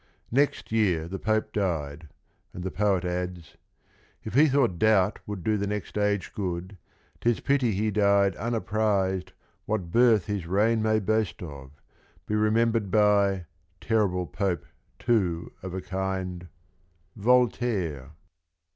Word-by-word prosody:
Next 140 0 +1
year 95 -8 +1
the 95 +2 -5
Pope 110 0 0
died, 80 -6 -2 0.5
and 90 - -6
the 95 - -3
poet 100 -3 +1
adds 90 -2 -4 0.7
"If 110 - -6
he 150 +5 +6
thought 130 - +1
doubt 105 -2 +3
would 100 -4 -5
do 110 -1 +1
the 100 0 -2
next 105 -2 -4
age 105 -2 0
good, 95 -1 -4 0.4
'T 120 - +1
is 120 - +1
pity 135 -5 +1
he 105 +3 0
died 100 -2 +3
unapprised 100 -5 -1 0.3
what 95 -6 -2
birth 115 -3 +4
His 100 -5 -3
reign 110 +5 +2
may 110 0 +2
boast 110 -1 -1
of, 70 -3 -10 0.5
be - - -4
remembered 110 0 +2
by 100 -2 +3 0.2
— - - -41
Terrible 100 -5 +1
Pope, 90 -4 -2 0.3
too, 95 -9 0
of 95 -1 -6
a 95 - -3
kind, 95 -2 -4 0.3
— 85 0 -40
Voltaire." 105 - +1
100 Hz, 140 wpm, -27 LUFS, 90-110 Hz, 0.7 s, he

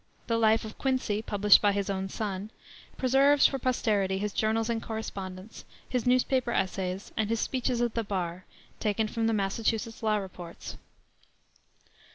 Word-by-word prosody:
The 230 -1 0
life 220 0 +3
of 215 - -9
Quincy, 255 -6 0
published 205 -2 +5
by 205 -1 +3
his 200 0 -1 0.2
son, 200 0 -4 0.5
preserves 270 +2 +4
for 270 - +3
posterity 210 -7 +1
his 205 0 -2
journals 220 +1 +1
and 230 -1 -1
correspondence, 195 -3 -6 0.2
his 250 -1 -1
newspaper 255 0 +2
essays, 190 -1 -2
and 220 -1 0
his 230 0 0
speeches 250 -1 0
at 240 -2 0
the 230 - -1
bar, 185 -3 -3 0.3
taken 215 0 0
from 225 +1 -1
the 225 - +2
Massachusetts 220 +3 -1
law 215 -1 +2
reports. 180 -4 -7
220 Hz, 150 wpm, -29 LUFS, 200-235 Hz, 0.5 s, published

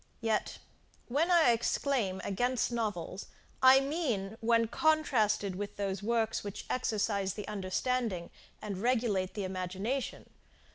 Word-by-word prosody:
Yet, 225 -2 0 0.5
when 300 +8 +1
I 335 -8 +6
exclaim 230 -4 0
against 245 +5 0
novels, 205 -5 -3 0.3
I 260 +1 +8
mean 265 - -2
when 230 0 +3
contrasted 220 - +2
with 205 +2 -5
those 200 -1 -2
works 225 +1 0
which 205 -1 -6
exercise 205 -5 0
the 210 - -6
understanding 210 -1 -2 0.3
and 200 -3 -4
regulate 225 -5 0
the 205 - -2
imagination. 190 +7 -3
220 Hz, 115 wpm, -31 LUFS, 195-250 Hz, 0.5 s, I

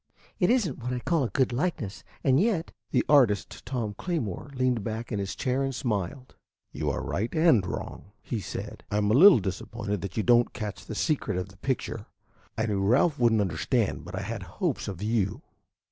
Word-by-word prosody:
It 180 - +3
is 240 -5 +3
n't 140 - -6
what 125 +1 -4
I - - -1
call 150 +3 +1
a - - -2
good 130 -3 +1
likeness, 125 - -2 0.2
and 135 0 +4
yet 190 -5 +1
" - - -58
The - - +2
artist, 115 -9 +3
Tom 115 -5 -2
Claymore, 145 - -3
leaned 125 -4 +1
back 110 +2 -4
in 105 - -1
his 95 -1 -3
chair 130 +1 0
and 135 -1 -1
smiled. 125 +2 -3 0.4
"You - - -2
are - - -2
right 110 +4 -2
and 155 - +5
wrong," - - -5 0.2
he 115 - -3
said. 100 - -6
"I 105 - 0
am 105 0 +2
a - - +4
little 180 - +9
disappointed 105 +1 -3
that 95 +2 -6
you 110 - +1
don't 120 +1 +4
catch 105 -3 -6
the 110 - -5
secret 125 - 0
of 90 +1 -3
the 95 - -17
picture. 130 +5 -3 0.5
I 110 - +1
knew 100 -3 0
Ralph 135 - +3
would 120 -2 +4
n't 110 - +3
understand, 100 +5 0
but 90 +2 -7
I 95 - -3
had 110 +1 -4
hopes 115 - -3
of 100 -1 -5
you." 110 +3 0
115 Hz, 210 wpm, -27 LUFS, 100-135 Hz, 0.5 s, little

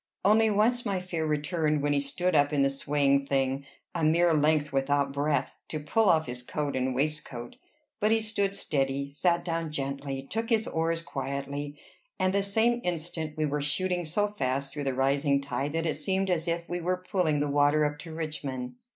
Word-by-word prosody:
Only 220 +2 +5
once 225 +4 +2
my 200 -4 -1
fear 170 -3 -3
returned, 150 0 0
when 145 0 +2
he 145 - +3
stood 175 +6 -1
up 145 -1 +4
in 145 -2 +2
the 135 - +2
swaying 140 0 +1
thing 135 0 0 0.3
a - - -2
mere 165 +2 +4
length 150 -1 +2
without 140 +1 +1
breadth 145 +1 0 0.2
to 155 - -4
pull 195 +8 +2
off 160 -1 +4
his 125 0 -5
coat 145 +3 -3
and 130 0 0
waistcoat; 140 -4 -2 0.4
but 210 - +2
he 225 0 +4
stood 200 -3 -1
steady, 140 -5 -1
sat 170 +4 +1
down 165 -2 -2
gently, 140 -1 -3
took 225 - -3
his 225 -2 +2
oars 165 +1 -1
quietly, 140 +1 -4 0.4
and 185 0 +1
the 200 - +3
same 225 +4 +2
instant 160 -3 -3
we 155 - +1
were 150 0 -1
shooting 180 +5 0
so 190 +6 +1
fast 140 -9 -2
through 145 -1 -4
the 135 -1 0
rising 140 +1 +2
tide 140 +1 -3
that 165 0 -1
it 160 - +1
seemed 190 -1 0
as 170 -1 0
if 170 0 -2
we 175 +1 -3
were 180 +1 -1
pulling 170 -7 +2
the 145 - +1
water 145 +1 +3
up 150 0 -2
to 165 +1 -9
Richmond. 145 -6 -4
150 Hz, 195 wpm, -28 LUFS, 140-175 Hz, 0.4 s, Only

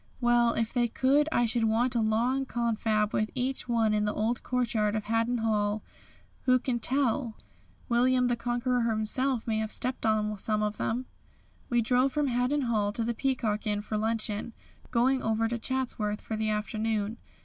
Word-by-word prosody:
Well, 240 -1 +3
if 230 0 -1
they 240 -2 +2
could 275 +6 +2
I 240 - +2
should 230 0 +2
want 235 +3 +2
a 235 - +1
long 240 +5 +1
confab 220 -3 0
with 215 0 0
each 255 0 -2
one 225 -2 +2
in 210 0 +1
the 210 - -1
old 225 +2 -1
courtyard 225 -4 0
of 215 - -2
Haddon 230 +3 0
Hall. 215 -2 0 0.6
Who 255 -1 +5
can 250 -1 -2
tell, 250 -1 0 0.5
William 250 +1 +3
the 245 - +1
Conqueror 245 +1 -1
himself 230 +3 0
may 220 -1 0
have 220 0 -3
stepped 255 +1 +1
on 215 -1 0
some 215 +1 0
of 210 0 -2
them." 245 +3 -2 0.6
We 240 -1 +2
drove 255 +3 +2
from 295 -2 +1
Haddon 250 +4 +1
Hall 215 -5 0
to 230 - -1
the 235 +1 -1
Peacock 225 -4 -1
Inn 205 -1 0
for 215 +1 -5
luncheon, 220 0 -1 0.4
going 255 +2 +2
over 225 0 +1
to 235 +1 -3
Chatsworth 230 -5 -2
for 220 - -4
the 215 0 -1
afternoon. 215 +1 -1
230 Hz, 180 wpm, -28 LUFS, 215-250 Hz, 0.6 s, Who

